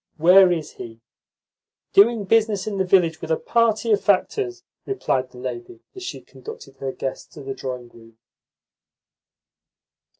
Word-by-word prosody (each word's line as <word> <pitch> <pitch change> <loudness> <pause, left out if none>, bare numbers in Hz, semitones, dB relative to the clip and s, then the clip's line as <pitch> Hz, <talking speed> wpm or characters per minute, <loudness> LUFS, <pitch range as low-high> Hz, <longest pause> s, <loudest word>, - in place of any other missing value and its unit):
"Where 180 +3 +7
is 165 -3 -2
he?" 115 -1 -10 0.9
"Doing 220 +2 +5
business 215 -1 +2
in 205 -2 -3
the - - +3
village 180 -3 +2
with 160 - -7
a 160 - +2
party 230 -1 +1
of 205 - +3
factors," 365 - 0 0.2
replied 130 - -1
the 125 - -16
lady 120 -2 -7
as 380 - -10
she 370 - -6
conducted 450 +1 -12
her 135 -1 -4
guests 130 0 -6
to - - -9
the 135 0 -4
drawing 125 -2 -6
room. 115 -1 -18
185 Hz, 145 wpm, -22 LUFS, -, 0.9 s, Where